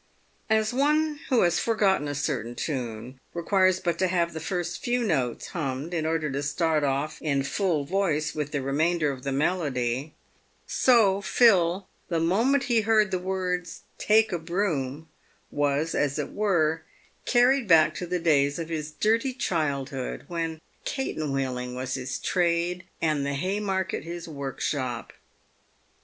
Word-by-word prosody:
As 220 +1 +2
one 300 +3 +2
who 250 -3 +4
has 175 -1 +2
for 230 - 0
gotten 190 -8 +2
a 145 - -3
certain 125 -5 -2
tune, 125 -3 -4 0.2
requires 185 +1 +3
but 170 -2 -1
to 185 - +3
have 170 -2 0
the 160 - -4
few 155 - -8 0.2
first 175 +6 -6
notes 180 - 0
hummed 145 -1 -3
in 160 -2 -1
order 160 -2 0
to 140 +1 -2
start 150 +1 +1
off 140 +2 -1
in 140 -3 0
full 165 0 0
voice 165 -3 0
with 150 -1 -3
the 145 -3 -2
remainder 155 +3 +1
of 130 -2 -7
the 140 - -3
melody, 140 -3 -1 0.5
so 215 -6 +4
Phil," 190 -5 +3 0.2
the 170 -2 0
moment 230 +12 +2
he 235 -4 +2
heard 215 -2 +3
the 185 - 0
words 180 -2 -3
" - - -39
take 220 +1 +5
a 175 - -1
broom," 160 -5 -2 0.4
was, 145 +2 0
as 145 -1 0
it - - -3
were, 165 -6 +1 0.5
carried 250 0 +4
back 155 -3 +6
to 175 +4 -5
the 180 +1 0
days 145 -4 +2
of 165 -1 -5
his 155 -2 -3
dirty 225 - +1
childhood, 140 - -2
when 165 -2 -3
" - - -38
catenwheeling" 135 - -2
was 130 0 -3
his 130 -1 -3
trade, 175 0 0 0.2
and 155 -3 +1
the 140 0 -1
Haymarket 190 +1 -1
his 170 +1 -7
workshop. 135 -4 -3
165 Hz, 155 wpm, -26 LUFS, 140-190 Hz, 0.5 s, back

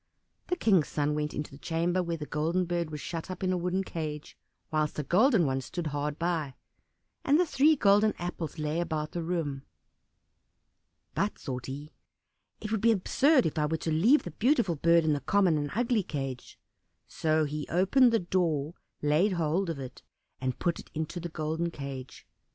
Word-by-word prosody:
The 360 - 0
King's 195 - +3
son 150 0 0
went 150 0 -1
into 150 - -5
the 140 - -12
chamber 170 +3 0
where 170 -1 -2
the 150 - -6
Golden 165 +5 0
Bird 170 -2 -2
was 150 -1 -6
shut 165 +5 -5
up 185 0 -6
in 185 0 +1
a - - 0
wooden 180 +2 -1
cage, 155 -4 -5 0.4
whilst 155 -1 0
a 150 - -1
golden 200 - +4
one 135 -1 0
stood 170 +6 -5
hard 145 0 -2
by; 165 -5 -1 0.7
and 290 +3 +4
the 360 - +4
three 310 0 +4
golden 210 -3 +4
apples 175 -3 -5
lay 155 +1 -1
about 155 -3 -2
the 175 - -3
room. 160 -5 -2 1.5
"But," - - -1
thought 125 -1 -5
he, 145 +3 -7 0.7
"it 215 - -6
would 220 -3 0
be 230 - +5
absurd 260 - +3
if 155 - -1
I 150 - +2
were 160 +1 -1
to 160 - -3
leave 220 - +4
the 175 - -6
beautiful 235 - +2
bird 170 +2 +4
in 155 - +3
the 145 - 0
common 185 +3 +3
and 145 -1 -1
ugly 235 -1 +2
cage," 135 -7 -5 0.5
so 155 -1 +1
he 150 0 -4
opened 235 +9 +4
the 230 - +4
door, 170 -5 0 0.3
laid 155 +7 +3
hold 170 +2 0
of 165 - -3
it, 130 -2 -8 0.4
and 130 -1 -2
put 170 -2 -1
it - - -12
into 160 +3 -3
the 175 0 -5
golden 160 +2 -2
cage. 140 -4 -8
165 Hz, 190 wpm, -29 LUFS, 150-185 Hz, 1.5 s, be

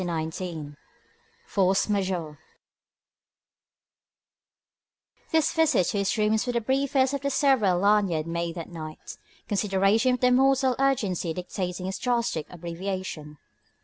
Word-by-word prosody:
XIX 160 -2 -4 0.7
FORCE 190 -1 +2
MAJEURE 185 -7 -2 2.9
This 320 -2 +2
visit 320 - +3
to 205 - -1
his 200 +3 0
rooms 215 +2 +1
was 245 - -1
the - - +3
briefest 265 +2 +1
of 280 - -2
the 280 - -1
several 260 -11 +3
Lanyard 195 -5 +2
made 170 0 -3
that 170 -1 -7
night, 155 -2 -9 0.3
considerations 210 +4 +2
of 250 0 +5
mortal 265 0 +3
urgency 200 -11 0
dictating 180 0 -4
its 190 +1 -4
drastic 235 - -1
abbreviation. 170 -3 -6
195 Hz, 115 wpm, -26 LUFS, 170-250 Hz, 2.9 s, of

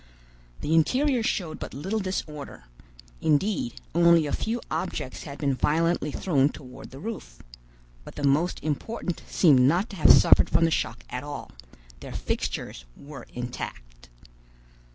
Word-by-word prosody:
The 155 - -1
interior 250 - +3
showed 180 -7 -2
but - - -7
little 190 +10 -2
disorder; 155 - -5 0.6
indeed, 210 - 0
only 170 -1 +5
a 145 - -3
few 230 +2 -1
objects 155 -4 -4
had 140 -2 -8
been 140 -2 0
violently 160 +3 +1
thrown 140 -4 +2
toward 130 -2 -11
the 135 - -11
roof; 205 - -7 0.6
but - - -12
the 145 - -6
most 145 +6 +2
important 170 +4 -3
seemed 150 -8 +5
not 170 - +3
to 195 - -8
have 155 - +7
suffered - - +6
from 165 +1 +3
the 165 - +1
shock 115 -5 -2
at 125 +2 -4
all; 145 0 -7 0.5
their - - -9
fixtures - - -3
were 140 0 -11
intact. 60 - -7
155 Hz, 145 wpm, -26 LUFS, 135-180 Hz, 0.6 s, have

